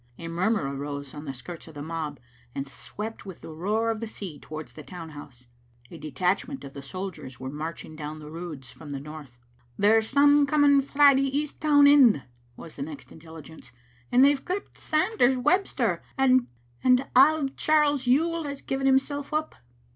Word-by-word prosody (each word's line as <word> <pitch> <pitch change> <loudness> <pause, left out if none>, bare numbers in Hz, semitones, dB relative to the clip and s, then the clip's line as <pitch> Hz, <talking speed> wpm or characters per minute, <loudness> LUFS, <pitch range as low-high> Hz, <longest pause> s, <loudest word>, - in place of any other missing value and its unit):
A 165 - -7
murmur 170 -4 0
arose 140 0 -6
on 150 +1 -8
the 135 - -4
skirts 165 +7 -9
of 160 - -13
the 145 - -6
mob, 155 -3 -5 0.4
and 135 0 -4
swept 215 +10 -7
with 190 -3 -10
the 160 - -9
roar 215 +8 0
of 220 - -4
the 230 - -4
sea 190 -8 -8
towards 155 0 -9
the 155 - -10
town 165 0 -9
house. 135 -4 -12 0.5
A 165 - -10
detachment 180 - -2
of 135 - -9
the 140 - -8
sol 185 +8 -5
diers 130 -6 -11
were 130 0 -5
marching 155 +1 -6
down 155 0 -6
the 150 0 -10
Roods 160 -6 -8
from 145 -3 -10
the 140 - -4
north. 145 -3 -10 0.4
"There's 220 +2 +3
some 285 +1 +5
coming 285 -1 +5
frae 280 +1 +5
the 270 +1 +1
east 300 0 -4
town 290 -2 +5
end," 270 - +6 0.3
was 165 - -11
the - - -6
next 290 0 -8
intelligence; 160 -4 -13 0.4
"and 255 +2 +6
they've 285 -1 +3
gripped 375 +2 -5
Sanders 310 - +2
Webster, 255 - +1 0.2
and 255 -2 +4 0.7
auld 275 0 +5
Charles 295 -4 +2
Yuill 325 +5 +2
has 280 -1 -6
given 270 0 -1
himsel' 275 +2 +1
up." 310 +1 -1
205 Hz, 180 wpm, -26 LUFS, -, 0.7 s, end